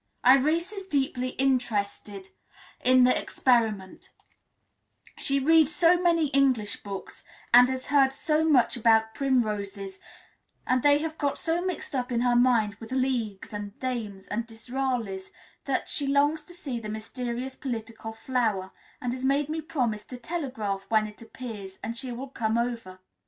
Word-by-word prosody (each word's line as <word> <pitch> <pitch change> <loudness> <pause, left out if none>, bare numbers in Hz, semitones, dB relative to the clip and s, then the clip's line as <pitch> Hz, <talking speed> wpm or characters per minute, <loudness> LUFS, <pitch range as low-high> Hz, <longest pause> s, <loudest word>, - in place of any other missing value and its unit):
Irais 305 +9 +4
is 390 -2 -7
deeply 265 -4 0
interested 210 -6 -1 0.5
in 255 0 +6
the 255 - +5
experiment; 220 -7 0 1.1
she 275 - 0
reads 310 +1 +4
so 335 +2 +5
many 335 -4 +3
English 260 -7 +1
books, 200 -1 -8 0.3
and 245 +1 +8
has 260 0 -3
heard 275 -2 +4
so 305 +3 0
much 270 -8 +3
about 220 -1 +3
primroses, 205 -7 -1 0.7
and 255 0 +2
they 290 +1 +5
have 315 +1 -4
got 285 -2 0
so 335 +1 -1
mixed 365 -4 -4
up 250 -1 -2
in 235 -1 +1
her 245 -1 +3
mind 240 -4 +3
with 225 +1 -10
leagues, 245 -7 -1
and 205 0 -6
dames, 225 -7 -4
and 230 +2 -2
Disraelis, 230 -4 -3 0.4
that - - -1
she 285 - -2
longs 290 +3 +2
to 350 - -12
see 275 -9 -4
this 215 -2 -7
mysterious 240 +4 -5
political 225 -4 -5
flower, 220 -5 -1 0.3
and 245 -1 -2
has 255 0 -6
made 280 +2 +1
me 320 +1 -2
promise 245 -9 -2
to 250 - -8
telegraph 235 - -4
when 220 -1 +3
it 210 +1 -10
appears, 220 -5 -8
and 230 - -3
she 255 +1 -5
will 255 +3 -6
come 225 -3 -1
over. 235 -6 -3
250 Hz, 155 wpm, -27 LUFS, 220-275 Hz, 1.1 s, and